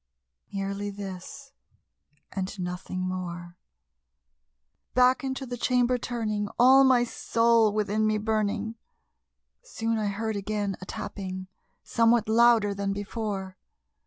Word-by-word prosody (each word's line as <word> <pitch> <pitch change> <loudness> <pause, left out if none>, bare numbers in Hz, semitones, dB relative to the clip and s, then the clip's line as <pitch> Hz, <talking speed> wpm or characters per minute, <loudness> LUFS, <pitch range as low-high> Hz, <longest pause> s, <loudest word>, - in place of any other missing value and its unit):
Merely 200 +1 -3
this 200 +7 -8 0.8
and 190 +1 -4
nothing 180 +1 -4
more. 175 -2 -5 1.4
Back 255 +1 +4
into 265 0 -3
the 245 -1 -5
chamber 250 0 +2
turning, 215 -4 -2
all 260 +3 +7
my 255 -2 +5
soul 230 -2 +2
within 215 +1 0
me 215 0 +2
burning, 215 +1 -1 0.8
Soon 230 - -2
I 210 - 0
heard 220 +2 -2
again 205 -1 -2
a - - -7
tapping, 185 -1 -6 0.3
somewhat 230 -1 +3
louder 225 -2 +4
than 200 0 -2
before. 200 -2 -4
215 Hz, 110 wpm, -27 LUFS, 195-235 Hz, 1.4 s, all